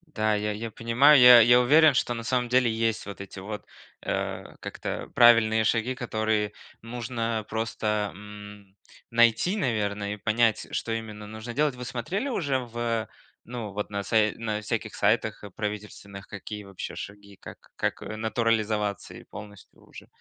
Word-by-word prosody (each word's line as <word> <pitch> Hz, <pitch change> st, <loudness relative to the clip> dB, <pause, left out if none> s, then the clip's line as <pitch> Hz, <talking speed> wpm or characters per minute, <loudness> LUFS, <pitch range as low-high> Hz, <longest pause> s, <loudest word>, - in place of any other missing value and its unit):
Да, 110 Hz, -1 st, +2 dB
я 105 Hz, 0 st, -1 dB
я 110 Hz, +2 st, -5 dB
понимаю, 125 Hz, +7 st, +5 dB
я 125 Hz, -1 st, +10 dB
я 120 Hz, +2 st, +6 dB
уверен, 150 Hz, +4 st, +6 dB
что 120 Hz, -1 st, 0 dB
на 115 Hz, -1 st, -5 dB
самом 125 Hz, 0 st, 0 dB
деле 125 Hz, -1 st, +3 dB
есть 115 Hz, 0 st, -1 dB
вот 100 Hz, -1 st, -8 dB
эти 100 Hz, 0 st, -9 dB
вот, 105 Hz, +2 st, -7 dB, 0.4 s
э, -, -, -3 dB, 0.2 s
как -, -, -8 dB
это, -, -, -4 dB
правильные 115 Hz, -2 st, +6 dB
шаги, 115 Hz, +3 st, 0 dB
которые 110 Hz, -3 st, -1 dB, 0.3 s
нужно 115 Hz, -1 st, -3 dB
просто, 105 Hz, -2 st, -1 dB
м, 105 Hz, 0 st, -12 dB, 0.3 s
найти, 120 Hz, -, +3 dB
наверно, 105 Hz, -, -1 dB
и -, -, -7 dB
понять, 110 Hz, +1 st, +1 dB
что 115 Hz, -, -3 dB
именно 110 Hz, -2 st, -5 dB
нужно 110 Hz, +3 st, -7 dB
делать. 145 Hz, +1 st, +1 dB
Вы 125 Hz, 0 st, -7 dB
смотрели 180 Hz, -, -3 dB
уже 145 Hz, -, 0 dB
в, 120 Hz, -2 st, -3 dB, 0.4 s
ну, 115 Hz, -3 st, -6 dB
вот 105 Hz, +1 st, -4 dB
на 100 Hz, -1 st, -3 dB
сай 110 Hz, 0 st, +2 dB
на 110 Hz, -2 st, -3 dB
всяких 110 Hz, 0 st, -3 dB
сайтах 110 Hz, +1 st, +1 dB
правительственных, 105 Hz, -1 st, -6 dB
какие 105 Hz, 0 st, -7 dB
вообще 100 Hz, -2 st, -7 dB
шаги, 100 Hz, -1 st, -10 dB
как -, -, -13 dB
как -, -, -2 dB
натурализоваться 110 Hz, -2 st, -1 dB
и -, -, -11 dB
полностью 105 Hz, -1 st, -12 dB
уже? -, -, -13 dB
110 Hz, 155 wpm, -26 LUFS, 105-120 Hz, 0.4 s, я